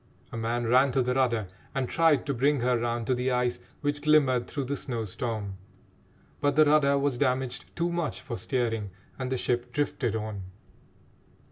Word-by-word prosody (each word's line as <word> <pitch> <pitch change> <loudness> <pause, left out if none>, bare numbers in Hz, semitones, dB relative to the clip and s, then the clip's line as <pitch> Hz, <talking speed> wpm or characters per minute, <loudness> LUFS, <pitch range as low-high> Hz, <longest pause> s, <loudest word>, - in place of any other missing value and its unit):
A - - -7
man 115 +1 -1
ran 130 +4 +4
to 130 - +3
the 125 +1 0
rudder 120 -6 +1 0.3
and 135 -2 0
tried 160 -2 +3
to 140 - -1
bring 140 +2 +2
her 125 +1 +2
round 120 0 -1
to 130 - +2
the 125 +1 0
ice 125 -1 0 0.2
which 145 0 -1
glimmered 140 -5 +3
through 140 - -3
the 140 +2 -2
snow 120 -5 -3
storm, 105 -1 -4 0.8
but 145 -1 +1
the 155 0 +6
rudder 145 -2 +4
was 140 -3 0
damaged 130 -2 0
too 170 0 0
much 170 -3 -2
for 120 - -6
steering 115 -5 -1 0.3
and 130 0 -3
the 130 - +1
ship 120 0 -1
drifted 125 -4 -1
on. 110 -2 -4
125 Hz, 180 wpm, -28 LUFS, 120-140 Hz, 0.8 s, the